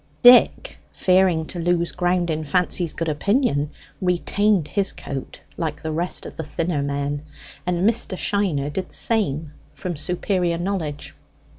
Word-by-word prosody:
Dick, 245 0 +6
fearing 185 -3 +3
to 175 - -6
lose 170 0 +1
ground 175 -1 0
in 155 0 -2
Fancy's 175 +1 0
good 165 - -3
opinion, 150 - +1 0.3
retained 185 0 +1
his 200 -2 +2
coat 135 -2 -7 0.2
like 155 -3 -3
the 160 - -2
rest 170 +3 -2
of - - -9
the 160 - -3
thinner 160 0 -2
men; 140 0 -2 0.5
and 180 +2 +2
Mr. 225 -4 0
Shiner 170 -10 0
did 185 +5 -4
the - - -8
same 160 -10 +1 0.2
from 180 -2 -4
superior 175 +2 0
knowledge. 170 -5 -3
175 Hz, 145 wpm, -22 LUFS, 155-185 Hz, 0.5 s, Dick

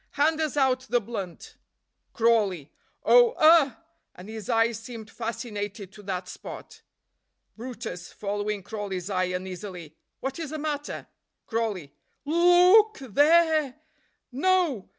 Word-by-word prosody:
hand 310 +2 +2
us 305 -2 -2
out 265 -2 +3
the 245 - +3
blunt." 200 -6 -7 0.5
Crawley. 210 -10 +1 0.3
"Oh, 485 -2 +6
ugh!" 310 -4 +6 0.4
and 185 +4 -11
his 220 -1 -8
eyes 225 -1 +2
seemed 225 -2 -10
fascinated 210 -4 -5
to 210 - -13
that 185 -2 -4
spot. - - -10 0.7
brutus 230 -6 -7
(following 205 0 -3
Crawley's 200 -2 -5
eye 185 -1 +1
uneasily). 180 -3 -6 0.2
"What 270 +3 -4
is 320 -3 -4
the 310 - -5
matter?" 295 -1 -4 0.4
Crawley. 210 - -3 0.3
"Lo 310 +4 -1
o 355 +3 +7
o - - +6
k 430 -11 -12
th 215 -6 -15
e - - +5
r 320 -1 +5
e! 255 - -15 0.6
No! 310 - +1
230 Hz, 140 wpm, -26 LUFS, 200-295 Hz, 0.7 s, o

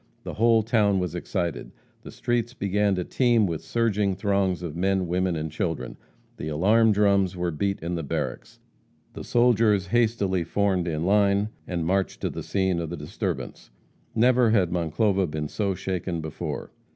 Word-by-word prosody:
The - - -6
whole 115 0 +3
town 105 -3 +2
was 90 -3 -2
excited. 90 -2 -3 0.3
The - - -11
streets 120 0 -2
began 100 0 +1
to 90 - -2
teem 120 +1 +2
with 85 -4 -3
surging 105 -4 0
throngs 95 -2 0
of 80 -3 -5
men, 95 +1 0
women 90 0 0
and 80 0 -4
children; 80 -7 -3 0.4
the - - -5
alarm 105 +9 +3
drums 100 -3 +2
were 90 0 -1
beat 100 +5 -1
in 85 +2 -3
the 85 - -2
barracks; 70 - -4 0.6
the - - -7
soldiers 115 -5 +3
hastily 100 -4 +1
formed 95 0 0
in 80 -1 -2
line 100 +1 +3 0.2
and 85 -3 -2
marched 95 +2 0
to - - -1
the - - -6
scene 95 -3 0
of 85 -2 -4
the 85 - -5
disturbance. 75 -4 -5 0.5
Never 120 +1 +4
had 100 -6 +2
Monclova 90 +3 +1
been 75 0 -3
so 100 +3 -2
shaken 90 -2 -3
before. 80 -1 -5
95 Hz, 165 wpm, -25 LUFS, 85-105 Hz, 0.6 s, Never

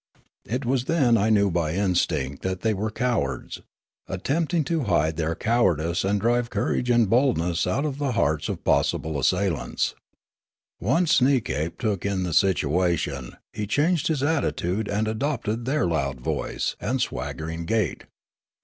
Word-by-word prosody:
It 125 +5 -3
was 125 0 0
then 135 -8 +3
I 110 0 +2
knew 100 -3 +3
by 85 -2 0
instinct 85 -8 0
that 95 -1 -3
the}' 110 -1 +1
were 105 +2 -2
cowards, 125 +2 -2 0.5
attempting 155 - 0
to 160 -2 -1
hide 80 -5 +1
their 80 0 -1
cowardice 85 -8 +1
and 100 +1 +1
drive 120 +2 +1
courage 120 +3 -1
and 120 -2 +4
boldness 95 - +2
out 135 +11 0
of 145 -2 -3
the 140 -3 0
hearts 80 -8 0
of - - -4
possible 70 +1 +1
assailants. 90 +3 0 0.9
Once 155 - +3
Sneekape 120 - +1
took 105 -6 -1
in 100 -2 -1
the 90 -3 -2
situation, 80 -7 +1 0.2
he 105 -1 -4
changed 155 - +1
his 150 -4 0
attitude 110 - 0
and 105 +2 -1
adopted 115 -1 -2
their 145 +3 +1
loud 70 -6 -1
voice - - -2
and 130 +5 -1
swaggering 80 -6 -3
gait. 105 -5 -1
105 Hz, 150 wpm, -25 LUFS, 85-125 Hz, 0.9 s, and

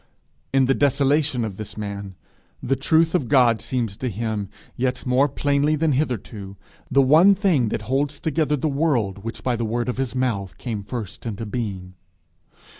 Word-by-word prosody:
In 135 0 +4
the 135 - +3
desolation 140 -2 +2
of 100 -4 -6
this 110 0 -7
man, 100 -2 -5 0.4
the 135 - 0
truth 160 +4 +2
of 150 -9 +1
God 120 -3 +4
seems 115 -6 -2
to 130 +1 -2
him, 110 -2 -3 0.3
yet 125 0 -2
more 130 +3 +3
plainly 145 +2 +1
than 155 +1 +1
hitherto, 110 -8 -3 0.3
the 135 +1 +4
one 165 +9 +6
thing 175 - +2
that - - -3
holds 140 +3 -1
together 155 -1 0
the 150 - -1
world 130 - 0
which 115 0 -6
by 125 -2 +1
the 115 - -2
word 120 +2 -1
of 125 - -2
his 130 -1 -2
mouth 110 -7 -1
came 115 -5 -4
first 110 +1 -6
into 110 0 -4
being. 100 -5 -4
125 Hz, 175 wpm, -23 LUFS, 110-145 Hz, 0.4 s, one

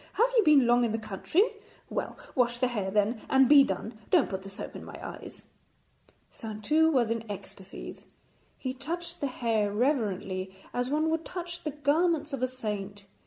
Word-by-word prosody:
Have 470 +3 +3
you 460 - +7
been 295 -6 +6
long 240 +1 +4
in 230 -2 0
the - - +1
country? 220 - +1 0.4
Well, - - -4 0.2
wash 240 -2 +2
the 255 0 +1
hair 205 -6 -2
then, 210 +3 +1
and 265 -1 +5
be 285 0 +8
done. 215 +1 -4
Don't 340 -11 +3
put 190 -1 -3
the 195 - -9
soap 195 - -8
in - - -7
my - - -9
eyes.' - - -9 0.9
Saintou 230 +10 +1
was 240 -6 +2
in 230 -1 -1
ecstasies. 195 -1 -8 0.6
He 255 -1 -3
touched 340 +6 -4
the 285 - +1
hair 225 -5 0
reverently 200 -6 -1 0.2
as 245 +1 -1
one 310 +2 +1
would 325 0 0
touch 345 -1 -6
the 310 - -3
garments 300 +1 +1
of 270 - -3
a 255 - +2
saint. 205 -5 -5
245 Hz, 180 wpm, -29 LUFS, 210-300 Hz, 0.9 s, be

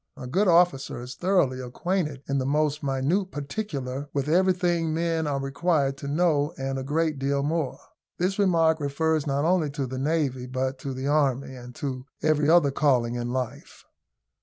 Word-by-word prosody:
A - - -7
good 190 +11 +1
officer 170 -8 +3
is 125 +1 -7
thoroughly 165 -5 +1
acquainted 150 +2 -2
in 140 0 0
the - - -1
most 150 +1 +1
minute 140 +8 0
particular 145 -5 -4
with 140 -1 -1
everything 175 -1 +2
men 165 -1 0
are 140 -1 -1
required 140 0 0
to 140 - -7
know, 150 -1 +1
and 135 0 -3
a - - -4
great 155 +1 0
deal 140 +1 0
more. 150 -2 -1 0.4
This 190 +3 -1
remark 165 -5 +3
refers 155 +1 0
not 140 +2 0
only 170 -3 +2
to 140 -1 -3
the 130 +1 -5
Navy, 135 -4 -1
but 130 +1 -2
to 135 -1 -5
the 130 +1 -4
Army, 140 -3 +1
and 125 -1 -11
to 130 -2 -5 0.2
every 155 -1 +3
other 165 -4 +5
calling 130 -5 +2
in 120 0 -3
life. 125 -2 -5
145 Hz, 175 wpm, -26 LUFS, 135-165 Hz, 0.4 s, other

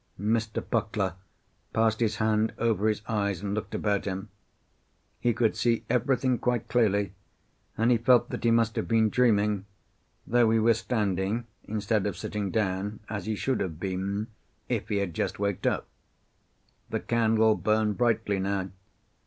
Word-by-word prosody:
Mr. 110 +1 -1
Puckler 105 -5 0 0.6
passed 110 0 +2
his 115 -2 +1
hand 110 0 +1
over 110 -2 +1
his 105 -1 0
eyes 100 -4 -1
and 100 -1 -2
looked 105 - -4
about 100 -2 0
him. 95 +1 -4 0.9
He 120 - +2
could 115 -1 +1
see 120 -1 +1
everything 125 0 +1
quite 120 -2 0
clearly, 105 -4 +2 0.6
and 115 +2 +3
he 120 - +4
felt 125 +1 +4
that - - -4
he 115 - +4
must 115 -1 +2
have - - -1
been 110 -2 +3
dreaming, 105 -5 +2 0.6
though 120 -1 +3
he 115 - +3
was 115 0 +3
standing 105 -1 -1 0.2
instead 105 -1 0
of 100 - -4
sitting 105 -2 -3
down, 100 0 -1
as 100 -3 -4
he 110 - 0
should 130 +5 -1
have 80 -4 -3
been 95 +2 -2 0.4
if - - -2
he 105 - 0
had 100 -4 -1
just - - -2
waked 100 -2 -1
up. - - 0 1.0
The - - -1
candle 110 -1 +3
burned 110 0 +1
brightly 110 -4 +1
now. 95 0 -2
110 Hz, 160 wpm, -28 LUFS, 100-115 Hz, 1.0 s, he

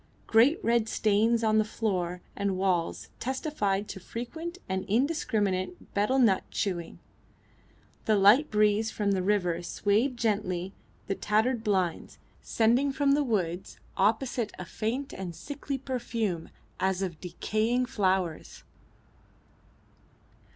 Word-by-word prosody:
Great 245 +9 +5
red 230 -1 +2
stains 220 +2 +2
on 220 0 +4
the - - +4
floor 185 -5 -2
and 200 -2 -1
walls 185 -3 0
testified 230 -7 -1
to - - -7
frequent 320 - -6
and 190 0 -2
indiscriminate 220 - -1
betel 210 +6 +2
nut 220 -8 +4
chewing. 175 -5 -3 1.1
The 215 - +3
light 210 +10 +6
breeze 210 +1 +3
from 205 -2 -1
the 190 -1 +1
river 180 -3 +1
swayed 210 +8 0
gently 195 -5 -1 0.3
the - - -1
tattered 220 +4 +1
blinds, 185 -6 -1 0.2
sending 240 +5 +2
from 280 0 +2
the 290 +1 +3
woods 190 -8 -2 0.2
opposite 225 +3 +1
a 180 - -6
faint 230 +9 -3
and 180 -3 -6
sickly 280 - -5
perfume 230 -9 -3 0.3
as 190 +1 0
of 170 -4 -5
decaying 220 +7 0
flowers. 190 -7 -1
210 Hz, 120 wpm, -28 LUFS, 190-240 Hz, 1.1 s, light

